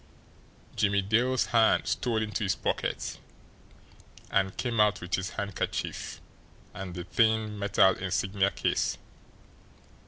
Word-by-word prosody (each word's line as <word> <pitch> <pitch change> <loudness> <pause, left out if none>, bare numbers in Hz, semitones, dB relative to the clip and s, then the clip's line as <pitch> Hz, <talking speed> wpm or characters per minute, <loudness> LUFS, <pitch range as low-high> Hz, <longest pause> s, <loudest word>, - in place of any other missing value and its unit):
Jimmie 100 -1 +2
Dale's 120 +5 +2
hand 115 -1 +4
stole 115 -3 0
into 110 +1 -3
his 95 - +1
pocket, - - -2 1.1
and 95 -1 +1
came 120 -3 -1
out 105 -1 +4
with 90 0 -8
his 95 0 0
handkerchief 100 -3 -3 0.5
and 95 -3 -7
the 90 - -4
thin 110 +1 +1
metal 100 -1 +4
insignia 95 +1 0
case. - - -1
100 Hz, 115 wpm, -28 LUFS, 95-110 Hz, 1.1 s, hand